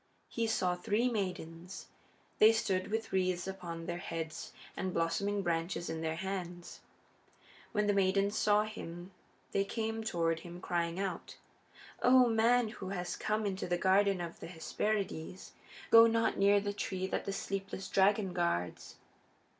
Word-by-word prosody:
He 230 -1 -1
saw 185 -5 +1
three 210 +7 +1
maidens. 180 -5 -4 0.5
They 220 +1 +8
stood 195 -4 0
with 225 0 -3
wreaths 185 -2 +1
upon 170 -3 -6
their 175 0 -3
heads 165 -2 -5 0.2
and 185 -1 -3
blossoming 200 +5 0
branches 170 0 -1
in 160 0 -4
their 160 0 -1
hands. 180 -1 -5 0.9
When 210 -2 +1
the 205 - +3
maidens 195 +1 +2
saw 210 0 +4
him 180 -4 -8 0.4
they 195 - +2
came 225 +2 -3
toward 165 -5 0
him 175 +1 -9
crying 170 0 -1
out: 190 -4 -4 0.6
"O 250 0 +6
man 230 +1 +3
who 195 -4 -7
has 180 -2 -3
come 215 0 -1
into 195 -2 -2
the 175 0 +1
Garden 195 +1 +3
of 170 -1 -6
the - - -7
Hesperides, 185 0 -3 0.4
go 230 0 +10
not 230 0 +2
near 200 +1 +5
the 205 0 -3
tree 190 -2 -3
that 190 - -2
the 195 - -2
sleepless 195 0 -4
dragon 195 -1 +3
guards!" 170 - -2
190 Hz, 150 wpm, -33 LUFS, 175-210 Hz, 0.9 s, go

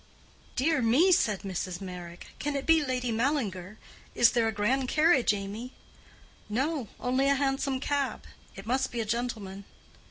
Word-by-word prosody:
"Dear 305 +1 +2
me!" 265 +12 +4
said 210 - +2
Mrs. 185 -2 -4
Meyrick; 180 -2 -8
"can 290 0 -2
it 275 - -2
be 325 -2 +4
Lady 250 -3 -1
Mallinger? 220 - -1 0.4
Is 235 - +6
there 230 -2 +2
a - - +1
grand 240 +6 0
carriage, 305 -2 +4
Amy?" 210 +5 -5 0.8
"No—only 265 +1 -1
a 280 - +4
hansom 270 -1 0
cab. 285 -1 -1 0.3
It 195 - -9
must 260 +3 0
be 240 - -4
a 225 - -1
gentleman." 215 -4 -3
245 Hz, 150 wpm, -28 LUFS, 205-275 Hz, 0.8 s, Is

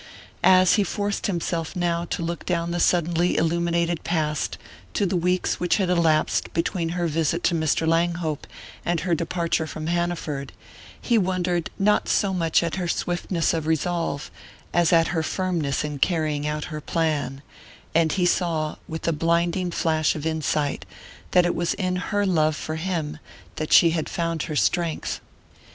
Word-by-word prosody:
As 185 +1 +6
he 205 - +4
forced 205 +2 -2
himself, 170 -2 -2
now, 170 -1 0
to 170 - -3
look 170 +1 -3
down 170 -1 -1
the 175 - -1
suddenly 175 0 +2
illuminated 170 0 +1
past 155 -3 -1 0.4
to 205 - +2
the 190 0 0
weeks 180 +1 0
which 175 0 +2
had 190 -3 +1
elapsed 165 -3 +2
between 165 0 0
her 175 - 0
visit 165 +1 0
to 180 - +2
Mr. 160 0 +1
Langhope 165 -2 0 0.4
and 175 -1 0
her 180 -1 0
departure 165 0 -1
from 155 0 -6
Hanaford, 170 -5 -2 0.5
he 235 -2 +2
wondered 180 -2 0
not 210 +1 +2
so 195 -2 +2
much 165 -2 +2
at 170 +2 -2
her 180 -2 -2
swiftness 175 0 0
of 160 -2 -2
resolve 160 -2 -1 0.4
as 175 -2 +3
at 165 -1 +4
her 165 -2 0
firmness 165 -5 -1
in 150 -2 -4
carrying 155 -3 0
out 150 0 -2
her 150 - -4
plan 145 -5 -1 0.5
and 165 -1 +3
he 180 -2 +1
saw, 165 -4 0
with 160 +1 -5
a 165 - +3
blinding 170 +3 +1
flash 160 -2 +1
of 155 -1 -5
insight, 155 -2 -1 0.5
that 180 -1 +4
it 175 - +1
was 170 +1 -1
in 185 -2 -1
her 205 +2 0
love 155 -5 +2
for 155 +1 -4
him 160 -3 -3 0.4
that 155 - -3
she 170 - +7
had 160 -2 -2
found 165 -2 -2
her 155 - -4
strength. 170 +2 0
170 Hz, 165 wpm, -24 LUFS, 160-175 Hz, 0.5 s, she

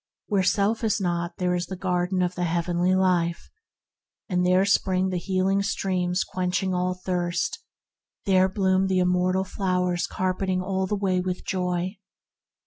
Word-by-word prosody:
Where 200 -3 +1
self 200 +4 +1
is 220 -1 +1
not 175 -2 -2
there 180 -2 0
is 180 0 -2
the 190 - -5
Garden 180 0 0
of 180 0 -1
the 180 -1 -2
Heavenly 175 +2 +1
Life, 175 -3 +1 0.8
and 180 -3 0
"There 185 +2 +4
spring 190 -1 +2
the 180 -1 -1
healing 190 +2 +1
streams 185 -2 0
Quenching 185 +1 -1
all 180 0 0
thirst 180 -1 -2 0.7
I 200 - 0
there 185 0 +5
bloom 190 0 +2
the 190 -1 +1
immortal 180 +1 +2
flowers 180 -2 -1
Carpeting 185 0 -1
all 190 0 -1
the 210 - -1
way 190 -2 0
with 180 0 -4
joy! 180 +1 -2
185 Hz, 155 wpm, -25 LUFS, 180-190 Hz, 0.8 s, there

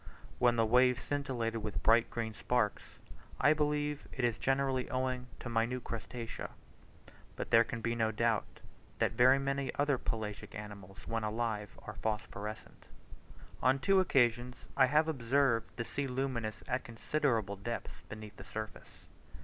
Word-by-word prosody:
When 120 -1 +5
the 115 -1 +3
waves 125 +2 +4
scintillate 130 -6 -1
with 105 -1 -4
bright 115 +1 +5
green 115 -2 -3
sparks, 105 -1 0 0.6
I 145 +3 +6
believe 150 -1 0
it 130 - 0
is 115 -2 0
generally 135 -1 +1
owing 130 -1 -1
to - - -6
minute 120 +2 0
crustacea. 115 +1 -5 0.9
But - - -5
there 115 0 +8
can 115 0 -5
be 115 +1 0
no 110 -1 +1
doubt 115 0 0 0.4
that - - +2
very 130 +2 +6
many 135 0 -1
other 145 -2 +2
pelagic 105 -2 -4
animals, 100 -2 -9
when 115 -1 -1
alive, 110 -1 -2
are - - -5
phosphorescent. 110 0 -4 0.7
On 130 +2 +4
two 195 +7 +4
occasions 125 -7 +2
I 130 -2 +6
have 150 +4 +4
observed 130 -4 +2
the 115 - -3
sea 140 +3 -2
luminous 125 -4 -2
at 130 0 -1
considerable 115 -3 0
depths 115 +4 -5
beneath 110 -1 -9
the - - -9
surface. 110 0 -8
120 Hz, 150 wpm, -33 LUFS, 110-135 Hz, 0.9 s, there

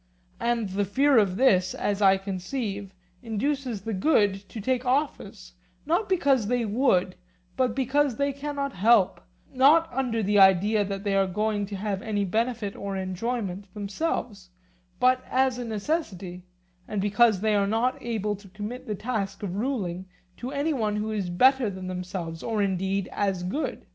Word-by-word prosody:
And 235 -3 0
the 200 +2 0
fear 265 +6 +4
of 195 -3 +1
this, 185 -8 +3
as 205 0 -1
I 195 -1 +6
conceive, 195 +1 -4 0.3
induces 240 0 -2
the 225 +2 -4
good 200 -3 +2
to 225 - -7
take 250 +4 0
office, 250 -8 -2 0.3
not 345 +7 0
because 275 - +2
they 245 0 +1
would, 205 -5 +2 0.4
but 255 -3 +1
because 270 0 +1
they 280 +2 0
cannot 280 0 -4
help—not 235 - +3
under 240 -4 -1
the 205 +1 +3
idea 195 +3 +5
that 195 0 -4
they 200 -1 0
are 195 -1 +3
going 210 +1 -1
to 200 - -6
have 195 -1 -3
any 205 -2 -1
benefit 220 +1 -1
or 200 -1 -4
enjoyment 195 0 -3
themselves, 205 - -3 0.5
but 255 0 +3
as 260 -1 +1
a 245 - -4
necessity, 200 - -3 0.4
and 210 - -3
because 205 0 +3
they 215 0 +2
are 200 -1 +2
not 230 +5 +1
able 215 -3 -2
to 200 0 -16
commit 210 +6 -7
the 210 - -2
task 205 -3 -3
of 190 -2 -3
ruling 195 -7 -2 0.3
to 245 - -5
any 290 +3 0
one 215 -6 -1
who 215 +1 -2
is 200 -4 -2
better 255 +6 +4
than 190 -1 -7
themselves, 180 -2 -5
or 220 -3 0
indeed 190 0 -1
as 195 -3 -1
good. 200 +13 -3
210 Hz, 165 wpm, -26 LUFS, 195-250 Hz, 0.5 s, I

